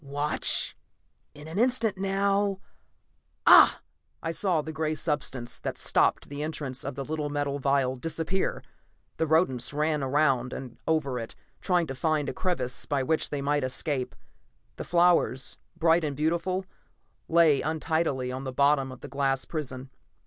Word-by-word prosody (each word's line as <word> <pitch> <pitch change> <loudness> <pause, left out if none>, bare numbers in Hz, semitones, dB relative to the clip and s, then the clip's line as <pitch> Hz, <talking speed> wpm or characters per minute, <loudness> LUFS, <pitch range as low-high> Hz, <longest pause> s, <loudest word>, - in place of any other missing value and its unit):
Watch... 145 +2 +2 0.6
In 150 +1 -11
an 165 +5 -4
instant 240 -3 +2
now... 195 +1 0 0.9
ah!" - - +8 0.4
I 165 - -1
saw 170 -3 0
the 160 - -6
gray 155 0 -1
substance 135 -6 -3
that - - -4
stopped - - +2
the 145 +1 -6
entrance 145 -4 -4
of - - -5
the 135 0 -5
little 150 0 -3
metal 145 -1 -2
vial 135 -2 +1
disappear. 165 +6 -2 0.5
The 160 - 0
rodents 135 -7 +2
ran 150 0 0
around 135 -2 +1
and 125 -3 -8
over 140 -6 0
it, 115 - -7 0.3
trying 180 -3 +2
to 135 - -5
find 150 +1 0
a - - -4
crevice 130 -9 -2
by 140 -2 0
which 160 +4 0
they 145 -2 -3
might 145 0 +1
escape. 130 0 -2 0.6
The - - -4
flowers, 170 -7 +2 0.2
bright 165 +1 +3
and 145 -2 -2
beautiful, 170 +5 0 0.6
lay 165 -4 +4
untidily 155 -4 -1
on 130 +1 -5
the 130 - -4
bottom 140 0 +2
of 130 - -11
the - - -7
glass 135 0 -1
prison. 130 -4 -5
150 Hz, 155 wpm, -27 LUFS, 135-165 Hz, 0.9 s, ah